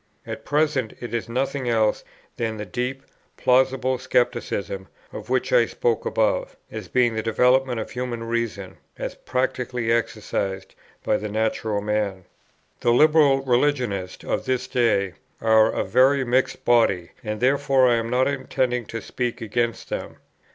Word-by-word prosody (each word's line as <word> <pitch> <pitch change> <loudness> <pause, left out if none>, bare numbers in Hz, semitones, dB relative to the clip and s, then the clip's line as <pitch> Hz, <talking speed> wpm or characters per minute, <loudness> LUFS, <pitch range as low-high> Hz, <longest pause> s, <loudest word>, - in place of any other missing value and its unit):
At - - -7
present 145 -5 +1
it 120 -2 -7
is 115 0 -2
nothing 130 +1 -1
else 110 -2 +2 0.3
than 110 -2 -2
that 105 -3 -7
deep, 125 +4 -3 0.3
plausible 130 0 +2
scepticism, 130 - -1 0.3
of - - -8
which - - 0
I - - +5
spoke 470 -1 -1
above, - - 0
as - - -6
being 120 -2 +2
the 110 - -1
development 125 +2 +2
of - - -5
human 125 -2 -4
reason, 115 -5 -3 0.2
as - - -4
practically 125 -2 -2
exercised 105 -4 -2 0.3
by 105 - +2
the 105 - -5
natural 110 -1 -1
man. 105 -3 -2 0.5
The - - +1
Liberal 150 0 +5
religionists 125 -8 0
of - - -2
this 130 -1 0
day 105 -6 +1 0.3
are 110 0 +5
a - - -1
very 135 +2 +4
mixed 130 +1 0
body, 105 -8 +3
and 105 -1 -3
therefore 135 0 +3
I 120 -1 +4
am 115 0 -2
not 125 +2 +2
intending 130 -4 -1
to 115 -3 -6
speak 125 -1 -3
against 115 +1 -2
them. - - -5
120 Hz, 150 wpm, -23 LUFS, 110-130 Hz, 0.5 s, I